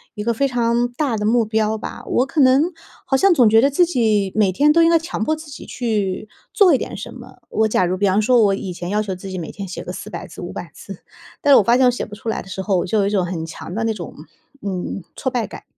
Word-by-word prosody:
一 210 - -4
个 235 +2 +1
非 275 +5 +1
常 240 -1 +1
大 260 -2 -1
的 210 - -2
目 230 +1 +3
标 220 0 0
吧。 - - -8
我 250 - +2
可 290 +2 0
能 265 +2 +5 0.4
好 270 - +1
像 385 +7 +4
总 250 -8 +5
觉 225 +1 +5
得 275 - +4
自 315 +6 +3
己 215 - +1
每 210 -3 +3
天 290 +11 +3
都 335 - +5
应 330 - +5
该 335 - +5
强 325 -8 -4
迫 310 +7 0
自 310 -1 -12
己 - - -9
去 215 -4 -2 0.2
做 385 -6 +5
一 - - +4
点 - - -6
什 - - -8
么。 - - -13
我 220 0 +1
假 195 -3 +1
如 180 +1 -1
比 200 +1 +1
方 195 +2 +2
说 240 +2 +4
我 200 -2 +3
以 190 -2 -5
前 175 0 -6
要 210 +2 +1
求 200 -2 -4
自 185 +2 -9
己 185 - -5
每 165 -3 -6
天 200 -1 -7
写 180 - -7
个 - - -6
400 - - -7
字、 - - -11
500 - - -7
字， - - -11 0.4
但 290 - +3
是 - - +9
我 - - +5
发 235 +4 +4
现 260 - +4
我 250 - +5
写 245 - -4
不 210 - -10
出 220 - -11
来 - - -2
的 - - -14
时 190 0 -5
候， 195 -1 0
我 - - 0
就 215 +4 0
有 200 - +1
一 - - +1
种 200 -3 +1
很 170 -2 -4
强 165 +1 -9
的 225 - -1
那 225 0 0
种， 175 -7 -8 0.5
嗯， 190 -1 -4
挫 260 - -2
败 245 -3 -1
感。 - - -10
220 Hz, 305 characters per minute, -20 LUFS, 195-255 Hz, 0.5 s, 是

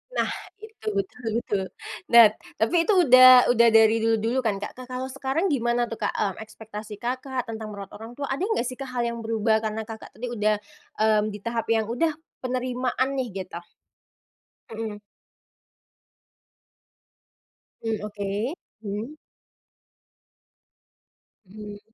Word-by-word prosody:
Nah, - - +1 0.3
itu 435 +1 -14
betul 200 +5 -4
betul. 205 -4 -1 0.5
Nah, 230 -3 +8 0.2
tapi 225 +9 +1
itu 420 - +2
udah 255 -1 +9
udah 235 0 +5
dari 225 0 +6
dulu-dulu 225 +3 +1
kan 220 -5 0
Kak, 200 - -6
ka 255 - -10
kalau 255 +1 -3
sekarang 270 +6 -2
gimana 240 -1 +1
tuh 230 -1 -8
Kak, - - +1
mmm, 200 -3 0
ekspektasi 215 -1 -9
Kakak, 255 +2 -3
tentang 220 -2 -6
merawat 200 -2 -9
orang 225 +4 -10
tua, 285 - -2
ada 270 +3 -3
enggak 400 - 0
sih 255 - -3
Kak, 265 +1 -7
hal 245 -1 -1
yang 235 0 -3
berubah 220 -1 +1
karena 220 0 -3
Kakak, 220 0 -9
tadi 245 - -4
udah, 215 -1 +2 0.4
mmm, 215 -1 +3
di 210 0 -7
tahap 230 -1 -1
yang 225 -1 +2
udah 245 +9 +1 0.3
penerimaan 255 0 -1
nih 260 -2 -1
gitu? 185 -2 -6 1.2
Mhm. 215 -2 -5 2.8
Mmm 225 -1 -1
oke, 205 +4 -3 0.3
hmm. 215 +7 -5 2.3
Hmm. 205 +1 -9
230 Hz, 135 wpm, -25 LUFS, 215-255 Hz, 2.8 s, udah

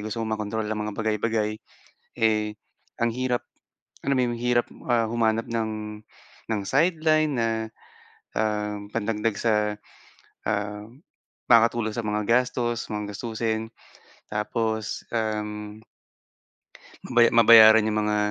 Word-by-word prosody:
Gusto 110 +2 -4
mong 110 0 -2
makontrol 105 +1 -3
ang 110 - -2
mga 105 0 -4
bagay-bagay. 110 0 -1 0.7
Eh, 105 -1 +2 0.5
ang 120 - +3
hirap, 125 -1 -1 0.7
alam 140 - +2
mo - - +4
'yon 120 - -1
ang - - -8
hirap, 120 -1 +2 0.2
ah, 120 -1 +3
humanap 115 -1 +1
ng, 115 -1 -1 0.8
ng 105 -2 0
sideline 155 0 +2
na, 115 - +1 0.9
um, 105 -1 -2
pandagdag 110 -1 -1
sa, 115 -2 +2 0.9
um, 105 +4 -4 0.5
makakatulong 115 -1 +4
sa 115 -2 -3
mga 105 0 -1
gastos 120 -1 +1
mga 105 -1 -4
gastusin 110 0 -3 0.7
tapos, 110 0 -2
um 105 -1 -3 1.3
mabaya 120 -2 +4
mabayaran 110 -1 +8
'yong 110 0 0
mga, 105 0 +1
110 Hz, 120 wpm, -25 LUFS, 105-120 Hz, 1.3 s, mabayaran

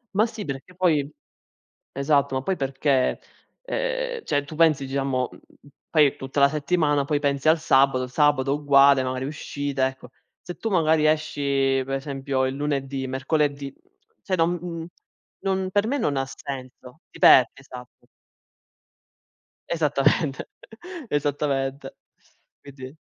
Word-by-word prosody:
Ma 215 +3 +4
sì, 220 -4 -7
perché 140 +6 -7
poi 155 -6 +1 0.8
esatto, 140 0 +1
ma 130 - -1
poi 190 +7 -1
perché, 135 -1 0 0.4
ehm, - - -3
cioè, 145 0 -1
tu 155 - -9
pensi 155 -4 +3
diciamo, 135 -2 -1 0.6
poi 150 -4 +4
tutta 135 +2 -4
la 140 - +7
settimana, 145 -1 +1
poi 145 +1 -1
pensi 140 +1 +1
al 160 +1 +4
sabato, 135 -3 +3
il 125 - -6
sabato 140 0 +2
uguale, 140 -2 +5
magari 130 0 -3
uscite, 140 -2 -3
ecco. 130 -2 -6 0.3
Se 175 - -8
tu 225 - -4
magari 160 -4 +3
esci 140 -3 +1
per 135 - -3
esempio 135 -1 -2
il 130 +1 -2
lunedì, 140 -2 -2
mercoledì, 140 +1 -1 0.5
cioè, 185 - -1
non 170 0 -2 0.5
non 190 -1 -1
per 205 +2 +1
me 280 +4 0
non 150 - 0
ha 135 - -1
senso. 130 +1 -9
Ti - - -15
perdi, 125 -3 +7
esatto. 125 -2 -13 1.6
Esattamente, 150 -2 0 0.6
esattamente. 140 -2 -2 0.7
Quindi 135 0 -11
140 Hz, 130 wpm, -24 LUFS, 135-155 Hz, 1.6 s, la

